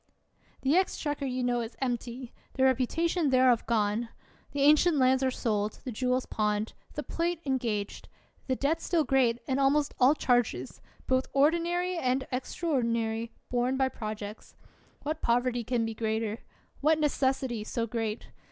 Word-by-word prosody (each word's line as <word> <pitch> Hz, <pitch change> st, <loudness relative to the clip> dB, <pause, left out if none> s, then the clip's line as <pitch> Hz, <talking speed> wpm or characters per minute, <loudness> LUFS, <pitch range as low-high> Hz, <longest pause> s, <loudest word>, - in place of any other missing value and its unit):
The 275 Hz, +4 st, +2 dB
exchequer 295 Hz, -6 st, 0 dB
you 255 Hz, 0 st, -2 dB
know 245 Hz, -1 st, +1 dB
is 230 Hz, +1 st, -7 dB
empty, 245 Hz, -1 st, -3 dB, 0.2 s
the 265 Hz, -, 0 dB
reputa 265 Hz, +6 st, +2 dB
tion 335 Hz, -3 st, +1 dB
thereof 255 Hz, -3 st, +4 dB
gone! 220 Hz, 0 st, +1 dB, 0.4 s
The 285 Hz, -, -2 dB
ancient 305 Hz, +3 st, +5 dB
lands 260 Hz, 0 st, +4 dB
are 265 Hz, -, +2 dB
sold, 215 Hz, -4 st, -1 dB
the 255 Hz, -, -4 dB
jewels 250 Hz, +2 st, 0 dB
pawned, 210 Hz, 0 st, -1 dB, 0.2 s
the 295 Hz, -, -3 dB
plate 335 Hz, +2 st, -2 dB
engaged, 235 Hz, -7 st, -2 dB, 0.4 s
the 260 Hz, -, +1 dB
debt 285 Hz, +5 st, +1 dB
46 -, -, -19 dB
ELIOT -, -, -6 dB
still 335 Hz, -3 st, +2 dB
great, 255 Hz, -4 st, +2 dB
and 265 Hz, -1 st, 0 dB
almost 280 Hz, +2 st, +2 dB
all 265 Hz, +4 st, +6 dB
charges, 245 Hz, -, 0 dB, 0.2 s
both 260 Hz, 0 st, +1 dB
ordinary 340 Hz, +5 st, +2 dB
and 260 Hz, -1 st, 0 dB
extraordinary, 235 Hz, -5 st, -1 dB, 0.2 s
borne 250 Hz, +2 st, +1 dB
by 265 Hz, -1 st, +2 dB
projects! 215 Hz, -2 st, -7 dB, 0.5 s
What 305 Hz, +2 st, -3 dB
poverty 245 Hz, 0 st, +1 dB
can 235 Hz, 0 st, 0 dB
be 225 Hz, -, -3 dB
greater? 220 Hz, 0 st, -2 dB, 0.4 s
What 310 Hz, +2 st, +3 dB
necessity 265 Hz, -6 st, 0 dB
so 230 Hz, +2 st, -2 dB
great 225 Hz, -1 st, -3 dB
255 Hz, 155 wpm, -29 LUFS, 230-280 Hz, 0.5 s, all